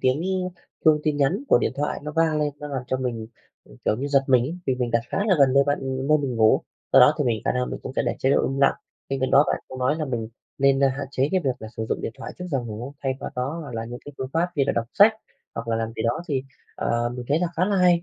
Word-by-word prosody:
tiếng 130 +3 +2 0.6
chuông 155 -2 +5
tin 150 -2 0
nhắn 160 - +1
của - - +6
điện - - 0
thoại 145 +1 -2
nó 150 +1 -5
vang 160 -2 +3
lên, 150 - +1
nó 150 - -6
làm 135 -3 -3
cho 130 - 0
mình, 120 -4 -3 0.4
ừm, - - -17
kiểu 105 - +2
như, 135 - -3
giật 140 -1 +4
mình 130 -2 +4
ấy, 160 +7 -4
vì 130 - +2
mình 125 -2 -2
đặt 115 - +2
khá - - -2
là 190 - +4
gần 135 -2 +5
nơi 140 +1 +5
bạn 145 0 +1 0.3
nơi 155 0 +5
mình 135 -4 -3
ngủ. 110 -1 +5 0.3
Do - - +8
đó - - +7
thì - - +1
mình 115 -3 0
khả - - +2
năng 125 0 -1
mình - - -5
cũng - - -6
sẽ - - +2
để - - 0
chế 135 - +1
độ - - +3
im 135 +1 -3
lặng. 140 - +5 0.3
Bên 135 -1 -2
cạnh 130 - 0
đó 140 +2 +6
bạn - - -1
cũng 130 - -8
nói 130 +4 +1
là 155 - -2
mình 115 -5 -3 0.3
nên, 135 0 +4
à, - - +5
hạn 135 +1 -4
chế 135 +1 +1
cái 190 - +3
việc 135 - +2
là 110 - -8
sử 110 - -3
dụng - - -1
điện - - -4
thoại - - -7
trước 180 - -5
giờ 135 -4 +1
ngủ, 120 +5 -7
thay 135 -1 +1
vào - - -5
đó 135 +6 -2
hoặc 140 -6 -8
là 115 0 -3
những 120 +1 -7
cái 145 - -9
phương 130 - -3
pháp 170 +2 +1
như 140 - +3
là - - +2
đọc 115 - 0
sách, 210 +2 +7 0.4
hoặc 115 0 -5
là 115 - +1
làm 115 0 -2
gì - - -2
đó, 120 +8 0
thì, 135 -3 0 0.3
ờ, 120 0 0
mình 125 0 -6
thấy 145 - +3
là 180 - +1
khá 175 - +3
là 200 +1 +1
hay, 180 -2 +4
135 Hz, 310 wpm, -24 LUFS, 120-150 Hz, 0.6 s, Do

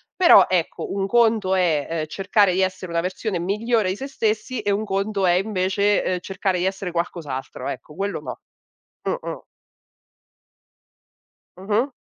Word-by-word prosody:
Però 360 -2 +7
ecco, 180 -3 -1
un 195 -1 -1
conto 220 -4 +3
è, 165 -6 +1
ehm, 165 -2 -2
cercare 195 +2 +2
di 190 - +1
essere 185 -1 -2
una 170 0 +1
versione 185 +2 -3
migliore 210 +2 0
di 190 - -2
se 270 - -5
stessi 225 -1 -1
e 205 -1 0
un 210 +2 0
conto 200 0 -1
è 175 - +5
invece, 195 +1 +1
ehm, 180 -1 -1
cercare 190 -1 -1
di - - -1
essere 190 -1 -2
qualcos'altro, 165 -6 -4
ecco, 125 +4 -7
quello 200 +2 -3
no. - - -7 0.6
Mh, - - -1
mh. - - -7 2.1
Mh-mh. 210 +7 0
195 Hz, 155 wpm, -23 LUFS, 180-210 Hz, 2.1 s, Però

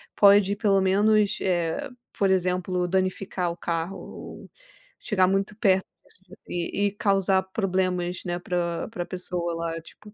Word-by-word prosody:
pode, 200 0 +6
pelo 200 -2 +3
menos, 210 +2 +3
eh, 175 - -1 0.3
por 195 - +2
exemplo, 180 -1 +1
danificar 185 -1 -1
o 170 - -8
carro 170 +2 -3
ou - - -10 0.5
chegar 190 -4 +2
muito 195 +2 0
perto 190 -4 +3 0.2
disso 190 0 -17
e 175 +4 -1
e - - -2
causar 195 -2 +2
problemas, 185 -3 -1
né, 175 -1 -2
pra 175 -1 -2
pra 200 -6 -4
pessoa 180 -1 -3
lá, 165 0 -3
tipo 210 +5 -16
185 Hz, 140 wpm, -25 LUFS, 175-200 Hz, 0.5 s, pode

